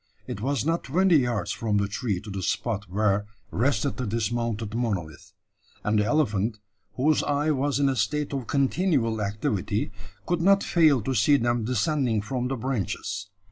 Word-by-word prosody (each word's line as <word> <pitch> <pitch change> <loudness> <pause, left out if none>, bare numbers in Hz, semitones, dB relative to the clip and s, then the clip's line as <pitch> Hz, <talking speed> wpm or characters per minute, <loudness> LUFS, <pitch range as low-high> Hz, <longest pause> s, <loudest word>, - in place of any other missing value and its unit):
It 100 - -6
was 135 +1 0
not 165 +2 0
twenty 175 +4 +4
yards 120 -9 0
from 110 -3 -1
the 100 0 +1
tree 100 -2 -2
to 105 0 -9
the 95 0 -4
spot 105 0 -2
where 100 +1 +1 0.2
rested 110 -4 0
the 125 - -2
dismounted 115 0 -2
monolith; 95 -10 -3 0.5
and 105 0 +2
the 105 - +2
elephant, 110 -6 +1 0.4
whose 150 +4 +3
eye 145 +2 +1
was 140 0 0
in 140 - +3
a 135 - +1
state 145 +7 -1
of 135 -4 -3
continual 135 - +1
activity, 105 +1 -1 0.3
could 175 -1 0
not 195 +2 +4
fail 155 - +4
to 130 - -1
see 135 +5 +4
them 120 -2 0
descending 125 -2 +1
from 125 +4 -2
the 135 - -2
branches. 105 -5 -3
120 Hz, 170 wpm, -26 LUFS, 105-140 Hz, 0.5 s, twenty